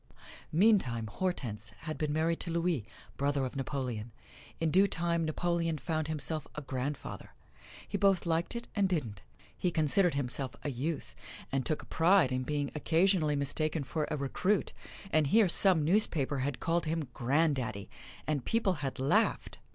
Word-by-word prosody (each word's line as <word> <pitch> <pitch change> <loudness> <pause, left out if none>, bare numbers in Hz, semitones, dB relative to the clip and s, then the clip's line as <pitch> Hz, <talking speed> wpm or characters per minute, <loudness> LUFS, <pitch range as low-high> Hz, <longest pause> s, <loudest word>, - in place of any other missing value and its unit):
Meantime 160 - +3
Hortense 115 - -3
had 155 -1 -4
been 150 -1 0
married 160 +2 +1
to - - -2
Louis, 165 -9 0 0.3
brother 140 -1 +1
of 130 - -6
Napoleon. 125 -5 -3 0.5
In 165 -1 +1
due 195 +4 +5
time 170 -2 0
Napoleon 165 0 0
found 155 +2 -2
himself 155 0 0
a 150 - -4
grandfather. 135 +2 -5 0.5
He - - -3
both 195 -3 +3
liked 165 +5 0
it 235 - -5
and 200 -2 +2
didn't. 115 - -2 0.3
He 180 - 0
considered 165 +1 +2
himself 130 -2 -1
a 145 - -2
youth 140 +4 -3 0.4
and 135 -1 0
took 155 - -1
a - - -12
pride 170 -4 +4
in 130 0 0
being 145 +1 -2
occasionally 160 0 +2
mistaken 155 +2 0
for 150 +2 -2
a 150 - -1
recruit, 180 +9 0 0.4
and 155 -2 +3
here 215 +6 +5
some 175 -3 +4
newspaper 155 -7 +2
had 135 0 -2
called 165 +1 0
him 160 -2 -1
"granddaddy," 130 -6 0 0.4
and 150 -4 -1
people 225 - +1
had 135 -2 -3
laughed! 135 +2 +1
155 Hz, 160 wpm, -31 LUFS, 135-170 Hz, 0.5 s, due